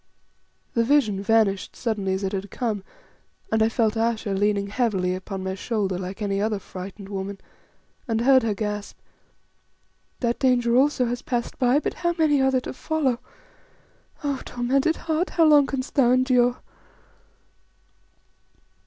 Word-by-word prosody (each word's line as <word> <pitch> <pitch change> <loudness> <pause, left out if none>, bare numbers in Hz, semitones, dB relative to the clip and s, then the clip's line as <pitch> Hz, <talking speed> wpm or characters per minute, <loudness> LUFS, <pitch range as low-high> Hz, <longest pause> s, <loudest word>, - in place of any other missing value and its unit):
The 230 - +2
vision 230 -7 +2
vanished 200 -2 +1
suddenly 205 -5 -1
as 190 +1 -2
it 190 - -1
had 195 0 -4
come, 220 -6 -3 0.7
and 220 0 +2
I 220 - +4
felt 225 -1 +1
Ayesha 225 -2 0
leaning 200 0 +1
heavily 200 -4 0
upon 185 +1 -5
my 190 0 -2
shoulder 195 -2 -2
like 190 +3 -5
any 200 -1 -1
other 215 0 0
frightened 195 +1 -9
woman, 195 0 -5 0.7
and 225 -1 0
heard 260 +1 +5
her 220 -3 -1
gasp 210 -1 -4 1.2
"That 240 -1 -1
danger 245 -3 +2
also 265 0 +3
has 245 +1 -3
passed 240 -2 -3
by, 250 +1 +4
but 300 - -1
how 345 0 -1
many 300 -4 +3
are 265 - +4
there 260 -1 +1
to - - -6
follow? 265 -3 -1 1.0
Oh! 280 -2 -1
tormented 265 +6 0
heart, 325 +3 -1
how 330 - +3
long 295 -2 +6
canst 265 -1 -4
thou 265 -5 +4
endure!" 250 -1 +2
230 Hz, 150 wpm, -24 LUFS, 200-260 Hz, 1.2 s, long